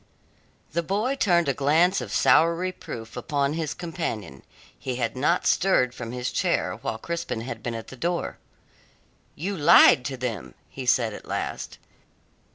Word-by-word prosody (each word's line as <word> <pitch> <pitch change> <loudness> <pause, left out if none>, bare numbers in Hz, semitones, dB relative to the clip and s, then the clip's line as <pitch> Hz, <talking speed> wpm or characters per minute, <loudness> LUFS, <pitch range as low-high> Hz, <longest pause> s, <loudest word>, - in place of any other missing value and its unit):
The 170 - 0
boy 205 - -1
turned 175 - +2
a 140 - +2
glance 160 +8 +3
of - - -7
sour 165 +1 +4
reproof 165 -11 -6
upon 145 -2 -1
his 160 -2 -3
companion. 135 - -5 0.4
He 130 - -3
had 115 -1 -2
not 150 +7 +1
stirred 150 -10 +3
from 115 -2 -7
his 125 0 -3
chair - - 0
while 110 - -4
Crispin 165 -3 -4
had 120 -1 -6
been 115 +1 -4
at 115 - -7
the - - -9
door. 170 +7 -2 1.0
"You 195 +6 -3
lied 150 -5 +7
to 135 -2 -3
them," 110 - -5 0.2
he 130 -2 -7
said 115 -3 +3
at - - -10
last. - - -4
140 Hz, 160 wpm, -25 LUFS, 120-170 Hz, 1.0 s, lied